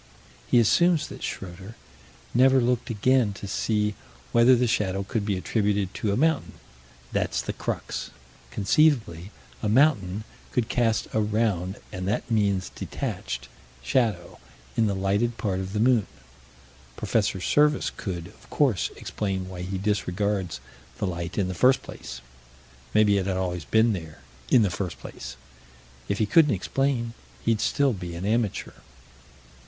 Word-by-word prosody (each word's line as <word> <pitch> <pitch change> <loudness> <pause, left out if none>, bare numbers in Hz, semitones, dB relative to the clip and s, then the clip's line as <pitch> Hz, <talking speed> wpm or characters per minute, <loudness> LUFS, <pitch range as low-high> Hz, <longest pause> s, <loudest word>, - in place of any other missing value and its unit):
He - - +3
assumes 165 - +3
that - - -9
Schroeter 95 +4 -6 0.6
never 130 +2 +5
looked 125 -1 0
again 115 0 +2
to 100 - -8
see 105 +1 0 0.4
whether 120 +2 +6
the 125 +1 +2
shadow 100 -4 0
could 105 +1 -2
be 100 -2 +1
attributed 100 -1 0
to 105 - -1
a 100 - 0
mountain. 160 +1 +1 0.6
That's - - 0
the - - -3
crux: - - -4 0.4
conceivably 105 - +2 0.3
a 105 - 0
mountain 110 -6 +3 0.3
could 120 -3 0
cast 115 -3 +1
a 110 - +2
round 105 -3 0
and 95 0 -4
that 105 +4 -2
means 100 -4 +1
detached 60 +1 -4 0.4
shadow, 100 - 0 0.4
in 110 - +3
the 100 - 0
lighted 100 +5 0
part 95 -3 -1
of 95 0 -4
the 105 - -2
moon. 120 -3 +3 0.9
Prof. 110 - +1 0.2
Serviss 150 -1 +3
could, 90 -4 -4
of 100 - -16
course, 130 - +2
explain 95 -3 -3
why 90 -1 -7
he 95 +2 -3
disregards 100 -2 -1 0.4
the - - -1
light 85 -2 -4
in 100 -3 +1
the 95 - -3
first 130 +9 +4
place 65 0 -8 0.7
maybe 105 -2 +5
it 95 - -2
had 95 -1 0
always 90 -3 -2
been 110 0 +3
there 80 -6 -7 0.3
"in 120 - +6
the 100 - +1
first 90 0 -4
place." - - -9 0.7
If 100 - 0
he 110 - +2
couldn't 150 +2 +5
explain, 120 +3 -1 0.3
he'd 115 -2 +2
still 140 -3 +2
be 90 -3 -6
an 85 +3 -5
amateur. 110 -1 0
105 Hz, 150 wpm, -26 LUFS, 95-115 Hz, 0.9 s, whether